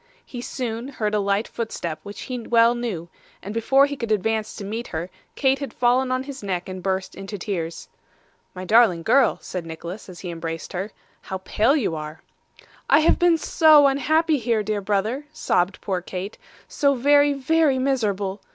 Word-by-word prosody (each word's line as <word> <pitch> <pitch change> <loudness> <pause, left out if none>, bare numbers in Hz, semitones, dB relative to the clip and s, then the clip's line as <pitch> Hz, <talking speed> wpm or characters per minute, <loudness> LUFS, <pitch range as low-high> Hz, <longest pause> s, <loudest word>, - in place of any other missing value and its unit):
He 245 - -7
soon 240 -1 -4
heard 215 -6 -3
a 210 - +2
light 200 +2 0
footstep 170 -8 -4
which 205 0 -9
he 255 -1 -5
well 230 0 +4
knew, 225 -9 -4 0.4
and 205 - -6
before 270 +5 +4
he 285 0 -4
could 235 -4 -4
advance 215 +1 0
to 200 - -7
meet 225 +4 -4
her, 170 +2 -5 0.2
Kate 265 -1 +2
had 280 - -5
fallen 255 +2 +2
on 255 0 0
his 275 0 -8
neck 185 -3 -3
and 185 -1 -6
burst 190 0 -2
into 195 +2 -7
tears. 170 -4 -4 0.7
'My 185 0 -6
darling 210 -5 +4
girl,' 255 +5 +4
said 180 -2 -5
Nicholas 170 +5 -8
as 180 - -10
he 180 - -5
embraced 165 -1 -6
her. 190 +4 -4 0.3
'How 190 - -5
pale 215 +8 +1
you 215 - 0
are!' 155 +1 -7 0.7
'I 285 - +6
have 315 - +3
been 350 -1 +4
so 310 -2 +5
unhappy 310 +3 +2
here, 230 -2 0
dear 210 0 -2
brother,' 210 +8 -1
sobbed 180 - 0
poor 185 -2 -2
Kate; 185 +3 -6 0.3
'so 280 -2 +1
very, 285 +3 +4
very 280 +1 +2
miserable. 210 -7 -1
220 Hz, 180 wpm, -23 LUFS, 190-265 Hz, 0.7 s, I